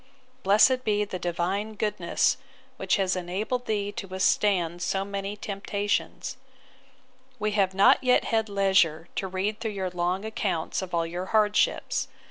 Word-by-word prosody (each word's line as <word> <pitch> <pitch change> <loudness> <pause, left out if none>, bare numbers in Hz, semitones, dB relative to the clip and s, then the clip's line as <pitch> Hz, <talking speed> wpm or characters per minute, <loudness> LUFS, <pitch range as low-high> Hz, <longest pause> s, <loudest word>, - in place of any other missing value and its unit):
Blessed 250 +6 +4
be 210 -2 +1
the 185 -2 -6
Divine 185 +5 -2
goodness, 210 0 +1 0.4
which - - +1
has 190 -2 +1
enabled 205 +8 -3
thee 205 -2 -1
to 200 - -6
withstand 185 -2 +1
so 195 +2 -1
many 200 +1 -4
temptations! 205 +5 -3 1.0
We 215 -1 -1
have 195 -2 +1
not 245 +9 +5
yet 250 -1 +4
had 220 -1 0
leisure 190 -5 +2
to 190 - -1
read 190 +3 -2
through 220 -2 -3
your 190 -2 -3
long 180 +3 -1
accounts 195 -7 -2
of 185 -2 -4
all 165 0 +1
your 175 +3 -5
hardships. 210 -1 +1
200 Hz, 145 wpm, -27 LUFS, 185-210 Hz, 1.0 s, not